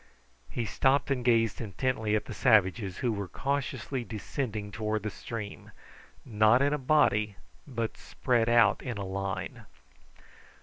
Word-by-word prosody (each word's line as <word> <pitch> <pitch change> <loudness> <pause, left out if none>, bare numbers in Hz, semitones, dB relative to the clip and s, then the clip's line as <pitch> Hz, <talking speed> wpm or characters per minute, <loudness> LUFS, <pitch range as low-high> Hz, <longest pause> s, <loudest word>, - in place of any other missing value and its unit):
He 120 - -3
stopped 135 +6 +2
and 125 -3 0
gazed 115 -3 +2
intently 110 0 -1
at 105 - -1
the - - -7
savages, 100 -5 +3
who 120 - +3
were 100 -2 -4
cautiously 140 +1 -2
descending 110 -1 -4
towards 110 0 -2
the 110 - -3
stream, 105 -2 -7 0.6
not 110 +1 +4
in 140 +2 +2
a 150 - -1
body 120 -7 +2 0.3
but 115 -4 -3
spread 120 -2 0
out 115 -3 +4
in 125 -5 -4
a 100 - -4
line. 95 0 -4
115 Hz, 140 wpm, -29 LUFS, 105-125 Hz, 0.6 s, not